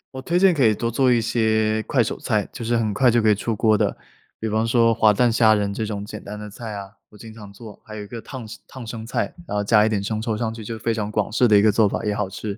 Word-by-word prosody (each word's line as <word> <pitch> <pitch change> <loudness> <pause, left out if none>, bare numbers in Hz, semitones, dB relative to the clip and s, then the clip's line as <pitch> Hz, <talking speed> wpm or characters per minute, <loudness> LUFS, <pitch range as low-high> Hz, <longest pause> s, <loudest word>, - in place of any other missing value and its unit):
我 130 - -5
推 170 +6 0
荐 190 -1 +5
可 135 -5 +3
以 110 - +5
多 115 +2 -2
做 125 +2 +2
一 120 - +4
些 110 -1 +1
快 - - +1
手 - - -2
菜， - - -1
就 - - -7
是 120 +1 0
很 110 -3 -1
快 125 +1 +3
就 120 0 +3
可 110 - +3
以 105 - +4
出 115 +3 -3
锅 110 0 +2
的， - - -1 0.4
比 110 - -3
方 110 +1 0
说 115 0 +3
滑 110 -1 +4
蛋 120 +4 +2
虾 115 -1 +4
仁 100 -1 -1
这 110 +1 -3
种 105 -1 -5
简 105 0 -9
单 105 +1 -8
的 105 0 -8
菜 110 +2 -8
啊， 100 -1 -7 0.2
我 105 - -17
经 110 +1 -11
常 105 -3 -12
做， 105 0 -13
还 110 -1 -9
有 105 - -6
一 105 - -11
个 115 0 -8
烫 125 -5 -9
生 - - -9
烫 125 -4 -10
生 110 -1 -6
菜， 115 - -2
然 105 - -4
后 - - +1
加 105 +1 +4
一 - - +1
点 105 -2 -1
生 110 +2 -3
抽 110 -2 -2
上 110 -1 -2
去 115 -1 -9
就 115 +1 -6
非 115 +1 -1
常 105 -1 -3
广 105 -2 -1
式 120 +2 +2
的 105 - +6
一 - - +5
个 110 - +4
做 105 0 +3
法 - - -3
也 105 -1 0
好 100 -2 -2
吃， 100 +2 -6
110 Hz, 340 characters per minute, -22 LUFS, 105-115 Hz, 0.4 s, 的